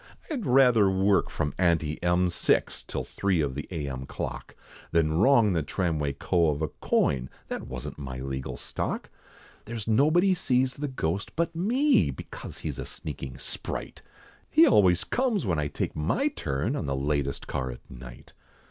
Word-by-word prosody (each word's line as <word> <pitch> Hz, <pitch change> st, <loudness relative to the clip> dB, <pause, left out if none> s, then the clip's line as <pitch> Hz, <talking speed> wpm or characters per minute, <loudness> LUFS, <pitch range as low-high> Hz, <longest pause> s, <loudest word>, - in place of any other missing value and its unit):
I'd 255 Hz, -9 st, -2 dB
rather 125 Hz, -6 st, +5 dB
work 95 Hz, +1 st, +2 dB
from 75 Hz, -2 st, -2 dB
ante 80 Hz, -4 st, +1 dB
M, 90 Hz, +1 st, +2 dB
six -, -, +1 dB
Till -, -, -4 dB
three 95 Hz, -4 st, 0 dB
of 70 Hz, -4 st, 0 dB
the 75 Hz, +2 st, -5 dB
A.M. 70 Hz, -6 st, -4 dB
clock, -, -, -6 dB, 0.3 s
Than 80 Hz, -2 st, +2 dB
wrong 115 Hz, -3 st, +5 dB
the 85 Hz, -, +1 dB
tramway 75 Hz, -2 st, -1 dB
co. 85 Hz, +3 st, +2 dB
of 75 Hz, +1 st, -1 dB
a 80 Hz, -, 0 dB
coin, 65 Hz, -1 st, 0 dB, 0.2 s
That -, -, -4 dB
wasn't 65 Hz, +3 st, -6 dB
my 65 Hz, -3 st, -5 dB
legal 65 Hz, 0 st, -4 dB
stock. -, -, -4 dB, 0.5 s
There's 115 Hz, -1 st, -6 dB
nobody 155 Hz, -, +4 dB
sees 130 Hz, -6 st, +1 dB
the 145 Hz, +1 st, -2 dB
ghost 100 Hz, -, -3 dB
but 170 Hz, 0 st, -1 dB
me, 250 Hz, -, +3 dB
Because -, -, -8 dB
he's -, -, -5 dB
a -, -, -4 dB
sneaking -, -, -7 dB
sprite, -, -, -6 dB, 0.5 s
He 320 Hz, +2 st, +7 dB
always 95 Hz, -, +5 dB
comes 240 Hz, -, 0 dB
when 85 Hz, -5 st, +1 dB
I 75 Hz, -, 0 dB
take 70 Hz, -, -3 dB
my 75 Hz, 0 st, +1 dB
turn 70 Hz, 0 st, -2 dB
On -, -, -3 dB
the 70 Hz, -, 0 dB
latest 70 Hz, 0 st, -1 dB
car 65 Hz, -1 st, -3 dB
at -, -, -9 dB
night. 60 Hz, -1 st, -12 dB
90 Hz, 165 wpm, -27 LUFS, -, 0.5 s, He